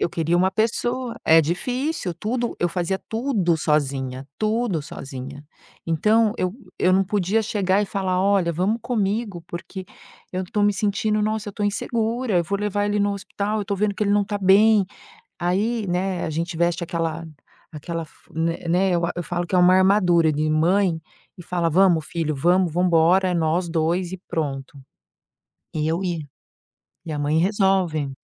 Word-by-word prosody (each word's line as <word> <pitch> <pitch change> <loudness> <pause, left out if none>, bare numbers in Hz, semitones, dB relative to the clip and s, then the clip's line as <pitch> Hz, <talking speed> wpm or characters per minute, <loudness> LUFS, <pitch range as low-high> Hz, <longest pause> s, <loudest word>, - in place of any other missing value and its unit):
Eu - - +1
queria 165 +1 0
uma 185 +1 +3
pessoa 235 +4 -1
É 160 0 +6
difícil, 245 - -2
tudo 235 +7 -2
eu 175 - +1
fazia 180 +2 -2
tudo 220 -8 0
sozinha 135 -4 -1
tudo 215 -5 0
sozinha. 135 +1 -8 0.4
Então 210 +7 +3
eu, 185 +2 -1 0.2
eu 185 - +3
não 190 +1 +3
podia 205 +3 0
chegar 200 -1 +1
e - - -2
falar: 185 -2 -1
"Olha, 190 -3 +2
vamos 195 +8 0
comigo, 210 -5 -2
porque 185 +2 -7 0.5
eu 185 +1 -2
tô 205 +3 -1
me 205 0 +4
sentindo, 210 +1 0
nossa, 215 0 -1
eu - - -18
tô 210 - -5
insegura, 225 +1 -1
eu 170 - 0
vou 200 +4 -2
levar 205 0 -1
ele 205 0 0
no 205 0 +1
hospital, 200 +1 -3
eu 205 - -2
tô 200 - -1
vendo 205 +1 0
que 210 - -3
ele 200 - 0
não 205 -1 +3
tá 205 +1 -3
bem". 200 +1 +5 0.5
Aí, 205 +6 0
né, 180 +1 -1
a - - -3
gente 165 +2 -3
veste 170 0 +1
aquela 165 -1 -3 0.5
aquela 165 +2 -5
f - - -23 0.2
né 165 +1 -1
né, 185 +2 +2
eu 170 0 +1
a 175 - -2
eu 175 - -3
falo 175 +2 -3
que 185 - -1
é - - +4
uma 180 +1 +6
armadura 185 -4 +4
de 155 +1 -1
mãe 165 +2 +2 0.4
e 175 - -10
fala: 170 -1 -1
"Vamos 170 -2 +3
filho, 160 -3 -2
vamos 175 +4 +2
vamos 180 +3 +1
embora. 175 +3 +4
É - - 0
nós 170 +2 0
2 170 +2 0
e 190 - -4
pronto". 140 -3 -4 0.9
Eu 160 +4 -1
ia. 170 -4 -3 0.8
E 160 - -4
a 145 - -3
mãe 145 +2 +1
resolve. 180 -7 +1
185 Hz, 180 wpm, -23 LUFS, 165-205 Hz, 0.9 s, É